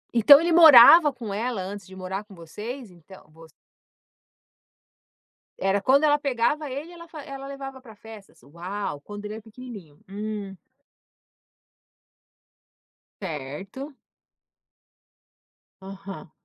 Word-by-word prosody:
Então 280 +6 +8
ele 340 +1 -1
morava 315 -1 +8
com 230 -6 -8
ela 230 0 -3
antes 195 0 -8
de 190 - -14
morar 190 +2 -6
com 205 -2 -17
vocês? 210 - -9
Então, 175 0 -17
voc 160 0 -17 2.1
Era 195 +1 0
quando 275 +6 +3
ela 295 -1 +3
pegava 285 +2 -2
ele 290 +6 -7
ela 335 -1 -13
fa 315 -2 -10
ela 275 -1 -9
levava 270 -1 -9
pra 225 -5 -15
festas, 215 - -15
uau, 170 +2 -6
quando 205 +4 -10
ele 210 +1 -6
é 220 - -10
pequenininho. 215 - -13
Hum. 205 -1 -6 2.7
Certo. 190 - -8 1.9
Aham. 195 -2 -11
215 Hz, 115 wpm, -24 LUFS, 190-275 Hz, 2.7 s, Então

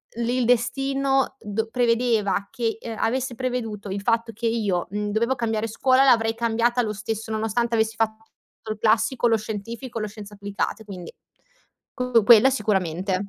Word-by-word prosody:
l 235 0 -2
il 250 -1 +1
destino 270 +3 +1
d 220 +1 -3
prevedeva 230 -5 +1
che 225 -2 -2 0.2
avesse 255 +2 0
preveduto 225 -5 -4
il 195 +1 -3
fatto 230 +2 0
che 230 +3 -6
io, 205 -6 0
mhmm, 210 0 -2
dovevo 235 +4 +1
cambiare 225 -2 -1
scuola 260 +4 +3
l'avrei 225 -4 +4
cambiata 235 +1 +1
lo 215 -1 -2
stesso 220 +2 -5
nonostante 225 +2 -1
avessi 220 0 +1
fatto 220 0 -1 0.5
il 215 - -4
classico, 225 +3 +2
lo 225 -1 +3
scientifico, 225 +3 -6
lo 215 - -2
scienze 205 0 -10
applicate. 200 +2 -3
Quindi 185 -4 -8 0.8
co 250 -3 +2
quella 235 +3 +8
sicuramente, 190 -5 0
225 Hz, 155 wpm, -24 LUFS, 210-240 Hz, 0.8 s, quella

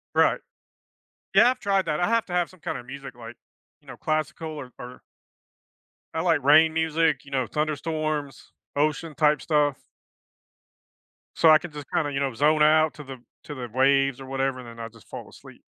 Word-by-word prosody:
Right. - - +3 0.9
Yeah, 245 - +6
I've 255 - -6
tried 195 -1 +1
that. 150 -2 -1
I 175 - +1
have 230 0 +1
to 180 - -8
have 175 -1 +1
some 185 - -19
kinda 125 - -5
music, 135 +1 -9
like, 120 0 -10 0.5
you - - -29
know, - - -10
classical 155 +1 -2
or 145 -5 -8
or 125 +1 -10 1.1
I 160 - -1
like 165 -5 +2
rain 155 +3 +6
music, 160 -3 +1
you 140 - -15
know, 130 -3 -1
thunderstorms, 155 -1 -3 0.2
ocean 155 +2 -1
type 150 -2 +3
stuff 145 -3 +1 1.6
so 165 - +5
I 155 0 +8
can, 180 +1 -9
just, 145 -2 -9
kinda, 145 -2 0
you 135 - -2
know, 135 -3 -1
zone 150 +5 +3
out 155 +1 +4
to 150 - -10
the 135 -1 -8 0.3
to 145 - -7
the 125 -3 -6
waves 135 +1 +2
or 135 - -9
whatever, 135 0 -2
and 125 -2 -10
then 115 0 -12
I'll 115 0 -6
just 115 -1 -19
fall - - -8
asleep. - - -16
150 Hz, 190 wpm, -25 LUFS, 135-160 Hz, 1.6 s, I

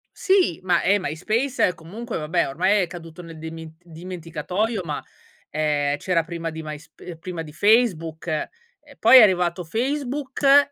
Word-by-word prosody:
Sì, 375 - +2
ma 180 -2 +2
eh, 200 +3 +3
MySpace 205 - 0
comunque 215 +8 -7
vabbè 165 +2 0
ormai 195 +9 +2
è 175 - -1
caduto 165 0 -10
nel 165 -1 -11
demint 160 +1 -9
dimenticatoio 180 +5 -4
ma, 150 -3 -4 0.5
ehm, 145 -2 0
c'era 170 +1 0
prima 165 0 -5
di 160 0 -7
MySp 155 +1 -10
ehm, 170 -2 -8
prima 175 0 -6
di 150 -2 -9
Facebook. 175 -6 +2
Ehm, 155 -2 -1 0.5
poi 235 +4 +8
è - - +10
arrivato 180 -3 +3
Facebook 275 - +2
175 Hz, 150 wpm, -23 LUFS, 160-215 Hz, 0.5 s, è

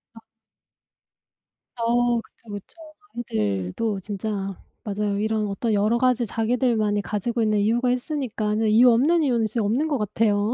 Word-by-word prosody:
아. - - -11 1.6
어 240 0 +1
그쵸 225 0 -22
그쵸. 205 - -9 0.6
아이들도 105 - -1
진짜 205 +2 -5 0.5
맞아요. 205 -1 -2
이런 215 0 0
어떤 215 +3 -1
여러 210 +3 +2
가지 250 -1 +2
자기들만이 225 -2 +1
가지고 230 +4 -2
있는 215 -1 +2
이유가 235 +4 +2
있으니까는. 230 -5 -1
이유 235 +4 +6
없는 305 +9 +3
이유는 235 -5 +2
진짜 220 +1 -1
없는 260 +10 +1
것 290 - +1
같아요. 210 0 +1
220 Hz, 320 characters per minute, -24 LUFS, 210-240 Hz, 1.6 s, 이유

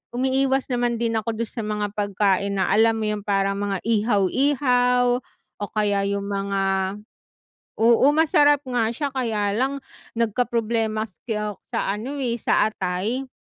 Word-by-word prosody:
umiiwas 265 +1 +1
naman 240 -1 0
din 230 -1 0
ako 225 +1 -3
dun 225 - -8
sa - - -7
mga 210 -1 -2
pagkain 200 -1 0
na 190 -1 0
alam 225 +3 +4
mo 220 - -3
yung 210 -1 -2
parang 195 -1 0
mga 200 -2 -2
ihaw-ihaw, 245 +3 +2 0.4
o 205 - -2
kaya 205 -2 +1
yung 200 0 -2
mga 195 -1 -1 0.8
oo, 235 +4 +5
masarap 290 -2 +4
nga 245 -4 0
siya 275 +4 -3
kaya 220 -6 -1
lang, 270 +5 -1 0.3
nagkaproblema 225 -1 0
ako 210 0 -5
sa - - -1
ano 235 +8 -5
eh, 240 -4 -2
sa - - +3
atay. 205 +9 -3
220 Hz, 145 wpm, -23 LUFS, 200-245 Hz, 0.8 s, oo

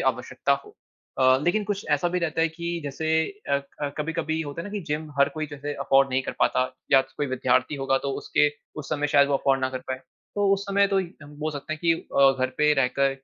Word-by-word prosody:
आवश्यकता - - -2
हो। 420 0 -16 0.5
अ, 130 0 +6
लेकिन 205 +5 +2
कुछ 200 0 -3
ऐसा 145 +4 +2
भी 180 +1 -1
रहता 165 -2 -1
है 165 - +3
कि 170 +1 -4
जैसे 145 +3 -3 0.4
अ, 140 0 +3 0.2
क 145 -1 -2
कभी-कभी 160 +1 -2
होता 145 +2 -6
है 205 - -7
ना - - -10
कि 210 - -2
जिम 155 0 -3
हर 140 - +5
कोई 155 0 -3
जो 145 0 -9
है 145 0 -2
अफोर्ड 135 0 +4
नहीं 130 +1 +1
कर - - -4
पाता, 130 - +3 0.3
या 135 - +8
कोई 135 +2 -4
विद्यार्थी 130 +1 +1
होगा 135 -1 +1
तो - - 0
उसके 150 - +3 0.3
उस 140 - -10
समय 150 -1 0
शायद 140 0 +6
वो 140 - +1
अफोर्ड 135 0 +1
ना 130 0 0
कर 130 - -4
पाए, 130 0 -2 0.4
तो 205 -1 +3
उस 195 - -4
समय 200 0 +4
तो 195 -1 +2 0.2
हम 145 +1 -12
बोल 155 +1 -2
सकते 145 +2 -5
है - - -3
कि 170 -1 +4
अ, 140 -4 +3
घर 130 0 0
पे 150 0 +5
रहकर, 135 0 +2
145 Hz, 245 wpm, -25 LUFS, 135-165 Hz, 0.5 s, या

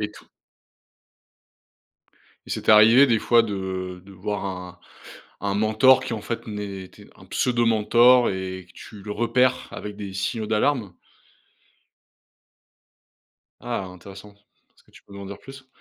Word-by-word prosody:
Et 105 0 -3
tout - - -17 2.2
et - - -11
c'est - - -5
arrivé 115 +6 +7
des 115 -4 +2
fois 115 +2 +4
de 95 -3 -5
de 100 - -14
voir 100 +2 -4
un 90 -2 -7 0.6
un 100 -1 -2
mentor 110 +5 +4
qui 115 - -3
en 110 - -5
fait 115 +2 -5
n'était 100 -3 -8
un - - -16
pseudo 120 -1 0
mentor 120 +3 +4
et 95 -1 -5
que - - -20
tu 105 -3 -12
le 105 +1 -6
repères, 120 +4 +1
avec 105 0 -7
des 100 -2 -7
signaux 100 +3 -3
d'alarme? 110 -3 0 2.7
Ah 120 -5 -4
intéressant, 95 +3 -12 0.4
est-ce - - -27
que - - -27
tu - - -17
peux - - -18
m'en 100 0 -9
dire 100 +1 -8
plus? 135 -1 -13
105 Hz, 145 wpm, -23 LUFS, 95-115 Hz, 2.7 s, arrivé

